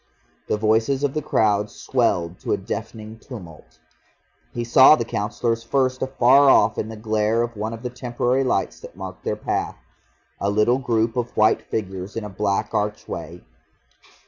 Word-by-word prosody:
The - - 0
voices 110 +6 +1
of 140 -2 0
the 155 - -1
crowd 105 -5 +1
swelled 90 -7 -1
to - - -2
a - - +1
deafening 110 0 -7
tumult. 85 - -12 0.7
He 120 - -3
saw 130 +5 +7
the 115 - -3
Councillors 115 +2 -2
first 130 +2 0
afar 130 +1 +5
off - - +4
in 110 - -3
the 110 - -7
glare 110 +1 +1
of 120 -1 -5
one 110 +2 -3
of 115 +1 -8
the 125 - -4
temporary 125 +1 -1
lights 95 -7 -1
that - - -12
marked 95 -1 -8
their - - -1
path, - - -3 0.6
a 100 - 0
little 105 +5 +2
group 115 -2 0
of 120 -1 -3
white 110 +1 +4
figures 95 -2 -4
in 115 - -3
a 105 - -6
black 100 +2 -1
archway. 105 0 -4
110 Hz, 170 wpm, -22 LUFS, 105-125 Hz, 0.7 s, saw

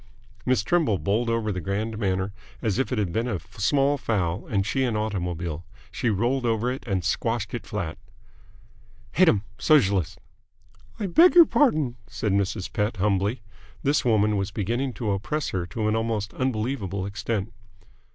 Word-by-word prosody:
Miss 125 -5 +3
Trimble 155 - +2
bowled 110 +6 0
over 115 -2 0
the 90 -2 -3
grand 105 +5 -2
manner 95 -1 -1 0.3
as 110 0 -1
if 135 - 0
it 125 - 0
had 100 -5 -1
been 115 +4 0
a 110 -6 -1 0.2
small 140 +7 +2
fowl 100 -3 -1
and 100 -4 0
she 130 +5 0
an 120 -4 0
automobile. 90 -6 -3 0.3
She 120 - -1
rolled 120 +6 +1
over 115 +1 +1
it 130 - -5
and 95 -5 -1
squashed 115 +2 -1
it 120 - -5
flat. 90 -7 -4 1.1
"Hate - - +5
'em! 100 - +2 0.2
Sogelist!" 100 - +3 0.8
"I 210 - -1
beg 330 - +6
your 340 -2 +10
pardon," 155 - +2
said 110 -2 -2
Mrs. 100 0 -1
Pett 105 0 -1
humbly. 100 +3 0 0.4
This 145 +2 +2
woman 105 -4 +3
was 100 -1 -1
beginning 120 +6 -2
to 110 -4 -2
oppress 120 +10 -2
her 90 -2 -2
to 105 +4 -2
an 110 - +2
almost 110 -2 -1
unbelievable 110 -6 -2
extent. 110 0 -3
110 Hz, 165 wpm, -25 LUFS, 100-120 Hz, 1.1 s, your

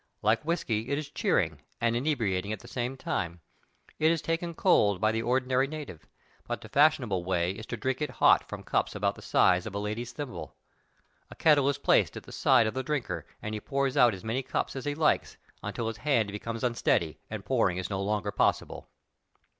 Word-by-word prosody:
Like 110 +2 +3
whisky, 125 -9 -1
it 140 - 0
is 150 -1 -5
cheering - - 0 0.2
and 115 0 +1
inebriating 110 -8 0
at 110 - -4
the 120 - -13
same 125 +2 -3
time. 85 -8 -3 0.6
It 155 - +4
is 165 0 +2
taken 165 +2 -2
cold 105 - +3
by 110 +2 +3
the 115 0 -1
ordinary 130 +2 +1
native, 145 - -8 0.4
but - - -3
the - - -11
fashionable 135 - +3
way 90 -1 0
is 110 +3 -8
to 120 - -4
drink 130 +5 -2
it 150 - 0
hot - - +4
from - - -6
cups - - -1
about - - 0
the - - -14
size 90 +2 +3
of 100 - -7
a - - 0
lady's 110 +4 -3
thimble. 135 0 -7 0.7
A - - -11
kettle 145 -3 +4
is 140 - 0
placed - - +2
at - - -8
the - - -13
side 115 - +4
of 110 - -1
the 130 - -2
drinker 145 -1 -3 0.2
and 105 - -4
he 105 - -4
pours 135 +1 -1
out 120 -6 +5
as 95 - -11
many 115 +4 -1
cups 130 - -3
as 135 - -5
he 145 0 -1
likes 155 0 +1 0.2
until 115 - -4
his 115 - -4
hand 120 -8 +1
becomes 115 +3 -5
unsteady 115 -9 +1
and 105 -2 -6
pouring 105 -8 +1
is 95 +2 -4
no 95 -1 -1
longer 105 0 -1
possible. - - 0
120 Hz, 210 wpm, -29 LUFS, 105-140 Hz, 0.7 s, out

